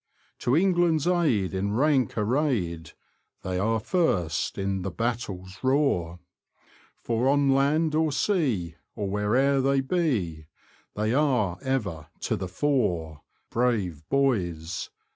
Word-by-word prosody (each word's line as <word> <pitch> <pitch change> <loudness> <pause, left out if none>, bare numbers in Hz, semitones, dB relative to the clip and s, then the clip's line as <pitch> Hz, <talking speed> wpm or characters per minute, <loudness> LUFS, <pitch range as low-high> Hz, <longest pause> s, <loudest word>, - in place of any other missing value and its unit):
To 125 - +1
England's 175 -4 +2
aid, 150 - +1
in 100 +2 -1
rank 135 -3 +2
arrayed. 105 - -1 0.5
They 90 -1 -2
are 110 +3 +1
first 110 - 0
in 95 -1 -1
the 95 - -3
battle's 100 -4 -4
roar,* 130 - +1 0.8
For 120 +3 0
on 140 -1 +3
land 150 +4 +2
or 155 0 +2
sea, 130 - 0 0.2
or 105 -3 -3
where'er 120 +8 +2
they 135 +1 +2
be, 115 - -1 0.5
They 110 +2 0
are 125 - +1
ever 105 - -2
to - - 0
the 95 - -4
fore 90 - -1
— - - -44
Brave 110 -10 0
boys! 90 -12 0
115 Hz, 125 wpm, -26 LUFS, 95-140 Hz, 0.8 s, on